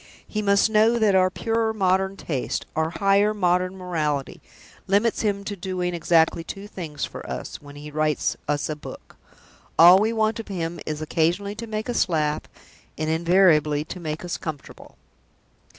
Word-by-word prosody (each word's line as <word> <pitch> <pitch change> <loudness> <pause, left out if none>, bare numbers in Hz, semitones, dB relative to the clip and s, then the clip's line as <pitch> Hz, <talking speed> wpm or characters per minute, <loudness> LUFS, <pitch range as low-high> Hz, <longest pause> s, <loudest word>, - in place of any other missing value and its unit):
He 215 - -2
must 200 0 +3
know 220 +2 +3
that 215 -3 +3
our 185 -1 +4
purer 225 +3 -1
modern 190 0 +1
taste, 135 -6 -3
our 160 0 +1
higher 200 +4 +2
modern 180 -1 +1
morality, 155 -6 -2 0.5
limits 205 +4 +2
him 200 -2 -1
to 205 0 -4
doing 180 -1 -3
exactly 165 0 +2
two 195 +4 -8
things 155 -8 -5
for - - -9
us, - - -6
when 145 -1 -13
he 150 +1 -9
writes 155 0 0
us 145 0 0
a 155 - -3
book. 150 - -11 0.6
All 175 +3 +9
we 220 +2 +1
want 220 0 0
of 225 - -7
him 170 -3 -4
is 155 0 -3
occasionally 170 +6 0
to 230 +2 -7
make 215 0 -4
us 240 -5 +1
laugh; 150 -3 0 0.6
and 155 +1 -1
invariably 160 -3 +3
to 180 - -7
make 160 0 -5
us 175 - -3
comfortable." 155 -4 -8
180 Hz, 165 wpm, -24 LUFS, 155-205 Hz, 0.6 s, All